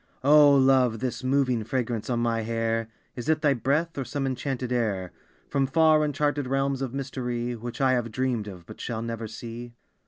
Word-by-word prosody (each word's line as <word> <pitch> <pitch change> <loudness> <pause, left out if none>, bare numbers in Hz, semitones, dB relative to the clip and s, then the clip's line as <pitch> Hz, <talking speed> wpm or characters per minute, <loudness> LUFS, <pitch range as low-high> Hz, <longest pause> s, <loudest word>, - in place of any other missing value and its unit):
O 145 0 +7
Love, 130 -3 +4
this 130 +2 -4
moving 130 -3 +1
fragrance 115 -2 -2
on 120 -1 0
my 115 -1 0
hair, 115 0 -1 0.3
Is 125 +4 -5
it 160 0 +2
thy 145 -2 +4
breath, 140 +6 0
or - - -1
some 135 +3 -3
enchanted 130 -1 -3
air 105 -7 -1 0.4
From 135 -1 0
far, 155 +1 +4
uncharted 145 -1 0
realms 135 0 0
of 130 -3 -2
mystery 125 -3 -3
Which 120 +3 -7
I 135 -2 +3
have 120 -3 0
dreamed 120 -3 -1
of 90 -4 -9
but - - -11
shall 115 -2 -3
never 115 -1 -4
see? 120 +2 -8
125 Hz, 185 wpm, -26 LUFS, 115-135 Hz, 0.4 s, O